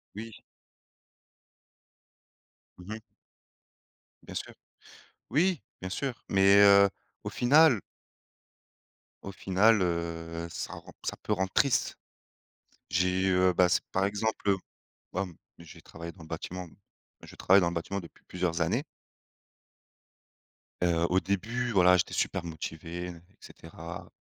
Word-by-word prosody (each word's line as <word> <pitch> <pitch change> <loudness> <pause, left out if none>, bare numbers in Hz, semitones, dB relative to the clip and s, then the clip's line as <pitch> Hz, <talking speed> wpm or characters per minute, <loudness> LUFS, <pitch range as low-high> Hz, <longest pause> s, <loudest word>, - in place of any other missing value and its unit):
Oui. 110 +1 -8 2.4
Mmh 95 +4 -8
mh. 110 - -10 1.2
Bien - - -10
sûr. - - -5 0.8
Oui, 170 +4 +2 0.2
bien 95 - -4
sûr, 125 +5 -4
mais 100 +1 +6
heu, 100 0 +7 0.3
au - - -3
final 135 -2 +5 1.4
Au 100 - -6
final, 100 +3 +3
heu, 85 -1 -3
ça 90 - -5
rend - - -11
ça - - -2
peut - - -5
rendre 95 -1 -1
triste. 140 -3 +2 1.0
J'ai, 90 +3 +2
heu, 90 0 +3
bah 90 +1 +4
s 90 - +3
par 95 +1 +1
exemple, 105 0 -1
heu, 95 - +3 0.6
hem, 90 -2 -3 0.2
j'ai 85 -2 -13
travaillé 85 +1 -9
dans 85 - -15
le 80 - -12
bâtiment 90 +2 -6 0.6
je - - -12
travaille 95 +2 +5
dans 85 - +2
le - - -6
bâtiment 95 +4 -3
depuis 85 - -15
plusieurs 90 -2 -2
années. 115 - +1 2.0
Heu, 85 -1 +3
au 95 +1 +3
début 110 +7 -2
voilà, 90 -2 +6
j'étais 90 - -1
super - - -1
motivé 85 +2 -6
et 90 - -6 0.3
cetera, 85 +1 -10
95 Hz, 125 wpm, -29 LUFS, 85-100 Hz, 2.4 s, heu